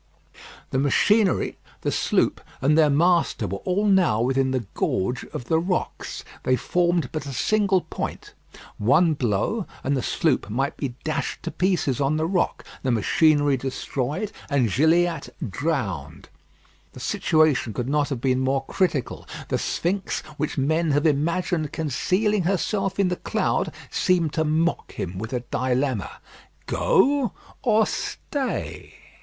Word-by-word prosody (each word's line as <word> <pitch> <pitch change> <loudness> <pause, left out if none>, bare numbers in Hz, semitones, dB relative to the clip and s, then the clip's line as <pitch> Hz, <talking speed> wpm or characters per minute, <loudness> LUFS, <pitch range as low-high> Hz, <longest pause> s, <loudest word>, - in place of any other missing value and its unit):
The 130 - +1
machinery, 195 +8 +2 0.2
the - - -1
sloop, - - +1 0.2
and 145 +3 +3
their 155 -2 +5
master 165 -5 +2
were 100 +1 -4
all 190 +3 0
now 190 - +4
within 130 +2 +2
the 130 -3 -1
gorge 120 +7 -1
of 120 - -7
the 160 +4 +2
rocks. 180 +2 -3 0.2
They 130 - +2
formed 175 +1 +1
but 155 -2 -4
a 140 - -5
single 200 +4 +2
point. - - -6 0.5
One 155 +10 +4
blow, 130 - -1 0.2
and 140 +1 +1
the 130 - 0
sloop 145 -3 0
might 135 +7 -1
be 130 -4 -4
dashed 155 - -3
to - - -3
pieces 180 -9 0
on 140 +3 +2
the 155 - 0
rock, 180 +1 0 0.2
the 130 - -1
machinery 145 +5 +3
destroyed, 135 - -3 0.2
and 130 -8 +2
Gilliatt 165 - +2 0.2
drowned. 95 - -3 0.6
The - - -10
situation 155 -7 +2
could 120 +3 -3
not 145 +1 +1
have 135 -5 -3
been 130 -1 +2
more 135 +1 0
critical. 160 - -1 0.2
The - - 0
sphinx, 185 +3 -1
which 150 +1 -3
men 160 +4 +1
have 145 +2 +2
imagined 160 +1 +1
concealing 185 - +1
herself 195 +1 0
in 195 -2 +3
the 180 - -2
cloud, - - 0 0.2
seemed 175 -5 +1
to 160 - +1
mock 160 +2 0
him 95 +1 -5
with 110 +2 -5
a 125 -2 -1
dilemma. 130 -4 0 0.6
"Go 265 +1 +2 0.3
or 220 -3 +4
stay." 280 -4 -4
150 Hz, 145 wpm, -24 LUFS, 130-180 Hz, 0.6 s, their